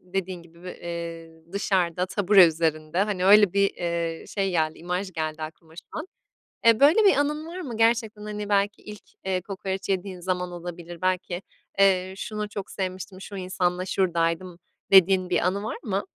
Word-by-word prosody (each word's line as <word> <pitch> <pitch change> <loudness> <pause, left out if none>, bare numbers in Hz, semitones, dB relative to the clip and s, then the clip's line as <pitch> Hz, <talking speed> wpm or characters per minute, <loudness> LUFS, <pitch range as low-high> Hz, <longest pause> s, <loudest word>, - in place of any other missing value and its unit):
dediğin 185 -1 -4
gibi, 170 +1 -19
v 180 - -8
eee, 165 -1 -7
dışarıda, 185 -3 0
tabure 195 -1 +6
üzerinde, 160 0 -1
hani, 200 -3 -1
öyle, 205 -1 +7
bir, 200 0 +3
eee, 170 -1 -3
şey 195 -2 -1
geldi, 160 -3 0
imaj 180 +3 -3
geldi 155 -1 -3
aklıma 160 +1 -9
şu - - -9
an. - - -5 0.6
Eee, 230 -1 +6
böyle 315 +10 +6
bir 395 - +6
anın 300 +2 0
var 355 +3 -6
mı? 245 -9 -6
Gerçekten, 225 -2 +1
hani, 210 -1 -5
belki 205 +1 +1
ilk, 210 -1 -10 0.2
eee, 185 -1 0
kokoreç 195 0 -5
yediğin 190 -1 -2
zaman 180 0 -2
olabilir. 175 -1 -8
Belki, 185 -1 -1 0.4
eee, 190 -1 +4
şunu 210 0 -4
çok 200 -1 -6
sevmiştim, 185 0 -5
şu 200 - -8
insanla 180 -1 -1
şuradaydım, 175 -1 0 0.3
dediğin 190 -1 +6
bir 180 - +2
anı 200 +2 -1
var 220 - -4
mı? 200 -2 -2
185 Hz, 170 wpm, -25 LUFS, 175-200 Hz, 0.6 s, öyle